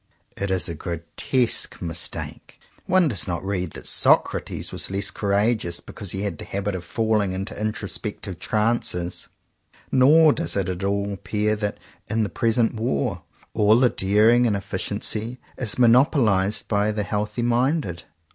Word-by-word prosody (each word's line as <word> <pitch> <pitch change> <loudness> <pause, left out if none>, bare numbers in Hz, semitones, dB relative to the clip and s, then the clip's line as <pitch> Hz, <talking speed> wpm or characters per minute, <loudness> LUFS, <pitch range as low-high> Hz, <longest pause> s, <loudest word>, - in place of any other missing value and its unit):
It 100 - -3
is 95 -1 +2
a 85 - -4
gro 85 +1 -5 0.2
tesque 125 -3 +1
mistake. 85 -2 -4 0.3
One 185 -2 +4
does 105 -10 0
not 90 +1 -3
read 90 -4 -2
that - - -10
Socrates - - +2
was - - -2
less 100 +1 -1
courageous 100 -3 0
because 100 - -8
he 95 +1 -3
had 100 -7 -3
the - - -6
habit 100 +1 -3
of 90 -2 -5
falling 105 0 0
into 95 +2 -4
introspective 105 -2 -4
ranees, 105 -5 0 0.6
nor 150 +4 +6
does - - -2
it 95 -2 -1
at 90 +1 -4
all 100 +1 -1
appear 105 +2 -1
that, 105 -1 -3 0.3
in 110 +1 +1
tthe - - -7
present 115 0 +1
war, 110 -12 -2 0.3
all 110 0 +4
the 125 -1 +5
daring 110 +6 +3
and 105 - +1
effi 100 - -5
ciency 115 +4 0 0.2
is 115 -5 0
monopolized 115 -5 +3
by 105 0 +1
the 105 -1 -2
healthy 105 +3 -2
minded. 120 - 0
105 Hz, 155 wpm, -23 LUFS, 95-115 Hz, 0.6 s, nor